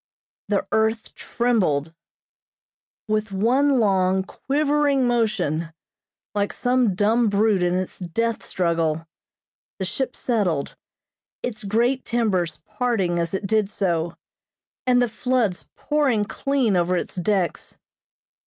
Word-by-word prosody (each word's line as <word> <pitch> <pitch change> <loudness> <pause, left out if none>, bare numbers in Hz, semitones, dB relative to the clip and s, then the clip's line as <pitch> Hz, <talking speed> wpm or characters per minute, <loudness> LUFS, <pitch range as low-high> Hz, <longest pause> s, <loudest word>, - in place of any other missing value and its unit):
The 205 -2 0
earth 220 +1 0
trembled. 180 -11 0 1.1
With 215 0 -1
one 255 +7 +3
long, 190 -3 +2
quivering 285 +2 +1
motion, 200 -10 0 0.6
like 205 0 0
some 245 -5 +1
dumb 220 +4 +3
brute 205 -1 +2
in 175 0 +1
its 185 0 -3
death 225 +6 -2
struggle, 165 -3 0 0.7
the 190 - -2
ship 255 +8 -2
settled, 190 - -1 0.7
its 240 -2 -4
great 235 +6 +1
timbers 185 -10 0
parting 210 -6 0
as 170 +2 -1
it 195 - -3
did 215 0 +1
so, 170 -5 -1 0.7
and 250 -1 +5
the - - +1
floods 225 -4 -1
pouring 275 -8 +1
clean 260 -2 0
over 180 +1 +2
its - - -4
decks. 185 0 -1
210 Hz, 115 wpm, -23 LUFS, 180-240 Hz, 1.1 s, and